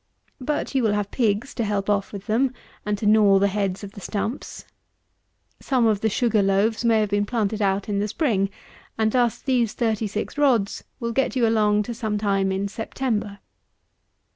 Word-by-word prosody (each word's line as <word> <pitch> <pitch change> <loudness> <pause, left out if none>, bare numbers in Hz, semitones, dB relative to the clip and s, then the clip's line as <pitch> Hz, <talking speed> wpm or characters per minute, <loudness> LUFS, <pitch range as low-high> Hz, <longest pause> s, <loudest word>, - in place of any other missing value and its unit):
But 295 +3 -2
you 265 - +2
will 220 -3 +2
have 205 -1 -2
pigs 225 +1 0
to 235 - -2
help 205 -2 -1
off 200 -1 0
with 200 -1 -8
them, 250 +4 +1 0.3
and 210 0 0
to 210 - -4
gnaw 210 -2 +5
the 200 +1 +3
heads 195 -1 -2
of 200 - -7
the 200 - -11
stumps. 215 +7 -4 0.9
Some 255 -4 +1
of 215 -3 +2
the 220 - +2
sugar 220 0 +2
loaves 200 +4 +1
may 225 -2 +4
have 210 -2 -1
been 205 0 +1
planted 215 -2 -1
out 195 0 +1
in 205 -1 -1
the 205 - 0
spring; 210 - 0 0.5
and 220 0 +2
thus 240 -2 +2
these 245 -5 +1
36 220 +2 -2
rods 240 -9 +2 0.2
will 235 -2 -2
get 270 +3 0
you 245 -2 +3
along 210 -2 +3
to 235 - -5
some 220 -2 -2
time 195 -2 +1
in 195 +1 -1
September. 220 -1 -3
215 Hz, 190 wpm, -23 LUFS, 200-235 Hz, 0.9 s, gnaw